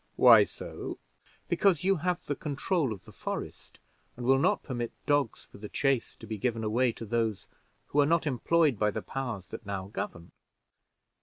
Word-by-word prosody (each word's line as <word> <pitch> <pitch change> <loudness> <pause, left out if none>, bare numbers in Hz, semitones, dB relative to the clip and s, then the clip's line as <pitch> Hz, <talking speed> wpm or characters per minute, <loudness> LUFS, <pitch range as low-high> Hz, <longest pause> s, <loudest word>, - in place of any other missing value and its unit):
"Why - - +8
so?" - - -7 0.5
"Because 190 -7 +3
you 195 0 +3
have 180 +2 -1
the 145 - -2
control 150 - -1
of 95 -4 -7
the - - -13
forest, - - -6 0.4
and 120 - -5
will 135 +1 +5
not - - +2
permit 120 -4 -3
dogs 145 -5 +1
for - - -15
the 105 0 -7
chase 135 -4 0
to - - -12
be 110 -2 -5
given 115 0 -1
away 120 +3 +2
to 115 - -8
those 110 -2 -1 0.4
who 145 - +1
are 145 - +5
not 165 0 +2
employed 145 -1 +2
by 105 - +3
the 100 - -4
powers 120 -8 -4
that - - -7
now 100 -2 -5
govern." 85 -4 -6
125 Hz, 180 wpm, -29 LUFS, 110-145 Hz, 0.5 s, Why